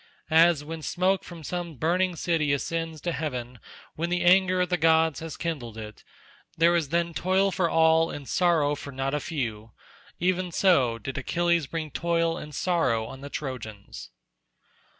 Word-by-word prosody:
As 165 -1 +5
when 160 +2 -6
the - - -12
smoke 185 +4 +1
from 170 -2 -10
some 175 0 -4
burning 175 +6 +1
city 160 -3 0
ascends 165 +2 -3
to 175 - -2
heaven 125 -5 -4 0.4
when 170 +2 -2
the 175 0 0
anger 185 +1 +4
of 180 - 0
the 180 - +1
gods 160 -1 +3
has 165 -1 -7
kindled 130 -10 -4
it—there 135 +9 -3
is 160 -5 0
then 170 +1 0
toil 190 +3 +1
for 180 -3 0
all, 160 0 +4
and 140 -2 -7
sorrow 165 -5 +2
for 145 -1 -7
not 135 +1 -2
a 150 - +1
few—even 155 +7 -4
so 135 -13 +3
did 135 +4 -5
Achilles 170 +2 +1
bring 155 0 -4
toil 165 +1 0
and 150 -3 -8
sorrow 130 -12 +1
on 135 +4 -9
the 140 - -7
Trojans. 125 -9 -7
160 Hz, 165 wpm, -26 LUFS, 140-175 Hz, 0.4 s, As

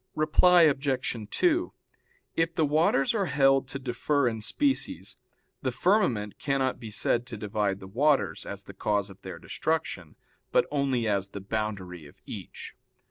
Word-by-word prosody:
Reply 170 +3 +5
Obj. 135 -7 0
2: 350 - +1 0.6
If 165 0 0
the 160 - +3
waters 150 0 +2
are 200 -4 0
held 135 -2 +3
to 135 - -4
differ 135 +2 0
in 110 -2 -2
species, 275 - -1 0.5
the - - -1
firmament 125 - +1
cannot 135 -2 0
be 115 -3 -7
said 120 +3 +1
to 120 -3 -6
divide 105 -1 -1
the 95 - -10
waters, 115 - +1
as 100 0 -7
the 95 - -11
cause 100 0 -1
of 95 - -16
their 95 -3 -7
destruction, 95 - -3 0.4
but - - +4
only 135 -5 0
as 100 -2 0
the 100 - -8
boundary 95 -5 -4
of 75 - -17
each. - - -8
125 Hz, 155 wpm, -28 LUFS, 100-150 Hz, 0.6 s, Reply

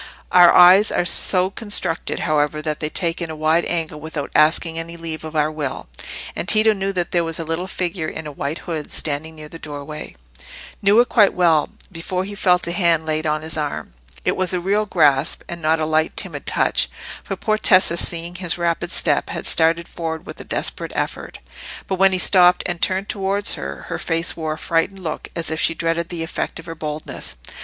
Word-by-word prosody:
Our 175 -1 +8
eyes 185 +4 +7
are - - 0
so 185 +2 +3
constructed, 205 -6 0
however, 150 -1 0
that 155 -1 -3
they 155 - -2
take 170 +1 -1
in 170 - -3
a 160 - -5
wide 155 +2 +1
angle 160 -3 -2
without 155 -2 -5
asking 160 +1 +2
any 170 +1 -7
leave 165 -1 -6
of 155 0 -8
our 150 0 +1
will; 140 - -5 0.5
and - - -3
Tito 215 +1 +5
knew 195 -1 -2
that 175 -2 -2
there 175 -1 +2
was 165 -1 -3
a 165 - -3
little 165 +3 -3
figure 175 -3 -3
in 160 - -6
a 150 - -6
white 145 +2 -4
hood 160 -4 -4
standing 155 +2 -2
near 155 -1 -10
the 165 +2 -11
doorway—knew 145 - -4
it 245 - +4
quite 210 -4 +4
well, 165 -4 +3 0.2
before 180 +2 -3
he 200 +2 -7
felt 180 -3 +2
a 170 - -2
hand 170 -3 +2
laid 155 0 -1
on 155 0 -1
his 160 0 -3
arm. 150 - -4 0.3
It - - +1
was 185 0 0
a - - 0
real 205 +4 0
grasp, 145 -7 +2
and 170 0 -7
not 160 +1 +2
a 155 - 0
light, 155 0 0
timid - - -2
touch; - - +1 0.3
for - - -4
poor 215 -1 -1
Tessa, 185 -4 +4
seeing 170 0 0
his 180 -2 -2
rapid 170 -1 -1
step, - - +2
had - - -5
started 165 +1 +2
forward 160 -1 -5
with - - -9
a - - -6
desperate - - -3
effort. - - -4 0.5
But 190 -1 -3
when 195 0 +6
he 185 - +2
stopped 180 -1 +5
and 175 -1 -3
turned 190 +2 +1
towards 200 0 0
her, 70 +1 -6
her - - -5
face 165 +1 0
wore 160 -1 -3
a - - -8
frightened 180 +4 -1
look, 155 -2 -5
as 165 -1 -2
if 160 - -1
she 165 - +2
dreaded 165 +1 -1
the 170 -2 -3
effect 165 - -4
of 165 - -11
her 165 - -6
boldness. 155 - -6
165 Hz, 210 wpm, -20 LUFS, 155-180 Hz, 0.5 s, Our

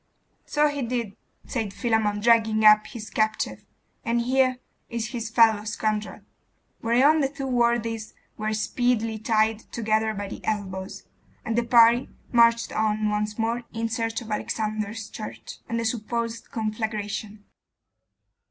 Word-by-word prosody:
'So 295 0 +3
he 290 -1 -3
did,' 235 -4 -3 0.3
said 225 -5 -3
Philammon, 220 -2 0
dragging 220 -1 +4
up 215 0 +7
his 220 -4 -8
captive, 220 0 -1 0.4
'and 235 +1 +1
here 255 +1 +2 0.3
is 230 -1 -3
his 235 -2 -4
fellow 220 -2 +4
scoundrel.' 215 0 -2 0.6
Whereon 260 +7 +4
the 275 -2 +1
two 275 -1 -6
worthies 235 -3 0 0.2
were 215 0 -2
speedily 225 0 0
tied 220 0 +2
together 220 -1 0
by 200 0 -4
the - - -8
elbows; 190 -3 -4 0.4
and 225 - -1
the 240 - +3
party 235 +1 +5 0.2
marched 235 -1 +4
on 215 -1 +1
once 210 0 -2
more 230 +1 0
in 225 0 -2
search 225 0 -2
of 220 -2 -9
Alexander's 215 0 -3
church, 215 - -8
and 230 0 -1
the 230 - -2
supposed 230 0 -3
conflagration. 215 -1 -4
225 Hz, 135 wpm, -25 LUFS, 215-235 Hz, 0.6 s, up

